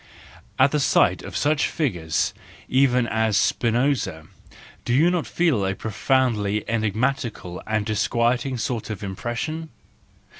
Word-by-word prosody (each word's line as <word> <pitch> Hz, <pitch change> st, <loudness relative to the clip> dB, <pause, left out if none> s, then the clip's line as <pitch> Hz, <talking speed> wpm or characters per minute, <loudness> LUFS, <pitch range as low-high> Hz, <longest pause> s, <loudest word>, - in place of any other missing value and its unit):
At 135 Hz, +1 st, +5 dB
the 150 Hz, -, +1 dB
sight 140 Hz, -, +3 dB
of -, -, -6 dB
such 150 Hz, +1 st, +2 dB
figures 85 Hz, -, -1 dB, 0.3 s
even 130 Hz, -2 st, +3 dB
as 110 Hz, -2 st, +1 dB
Spinoza, 115 Hz, -, +1 dB, 0.6 s
do 120 Hz, -, 0 dB
you 165 Hz, +6 st, +4 dB
not 175 Hz, -3 st, -1 dB
feel 160 Hz, -, +1 dB
a 95 Hz, 0 st, -1 dB
profoundly 110 Hz, -2 st, 0 dB
enigma¬ 115 Hz, +4 st, 0 dB
tical 90 Hz, -7 st, -7 dB
and 110 Hz, -1 st, 0 dB
disquieting 120 Hz, +4 st, 0 dB
sort 115 Hz, -1 st, -3 dB
of 105 Hz, -1 st, -5 dB
impression 120 Hz, +11 st, -4 dB
115 Hz, 125 wpm, -23 LUFS, 105-135 Hz, 0.6 s, At